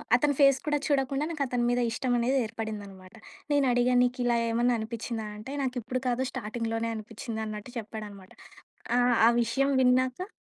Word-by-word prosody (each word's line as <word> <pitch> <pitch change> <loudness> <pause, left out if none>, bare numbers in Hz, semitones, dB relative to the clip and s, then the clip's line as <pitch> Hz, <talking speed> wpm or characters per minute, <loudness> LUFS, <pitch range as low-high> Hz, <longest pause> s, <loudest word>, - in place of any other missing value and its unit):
అతని 285 +3 +2
ఫేస్ 275 -1 +6
కూడా 295 0 +2
చూడకుండా 275 0 +1
నాకు 300 -4 -1
అతని 245 -1 -1
మీద 245 0 +1
ఇష్టం 250 +1 -1
అనేది 260 +3 +1
ఏర్పడిందన్నమాట. 205 -3 -7 0.4
నేను 285 -1 +3
అడిగాను 245 0 +3
నీకు 250 +1 -3
ఇలా 240 -1 +3
ఏమన్నా 240 +1 +2
అనిపించిందా 225 0 -4
అంటే, 265 +7 -8
నాకు 255 -1 -2
ఇప్పుడు 255 +3 -3
కాదు 250 +1 +1
స్టార్టింగ్‌లోనే 230 -1 -3
అనిపించింది 220 +1 -6
అన్నట్టు 215 +3 -7
చెప్పాడనమాట 205 -3 -9 0.7
ఆహ్, 245 -1 +4
ఆ - - +7
విషయం 275 +5 +1
విన్నాక 255 - +2
245 Hz, 160 wpm, -28 LUFS, 220-260 Hz, 0.7 s, ఆ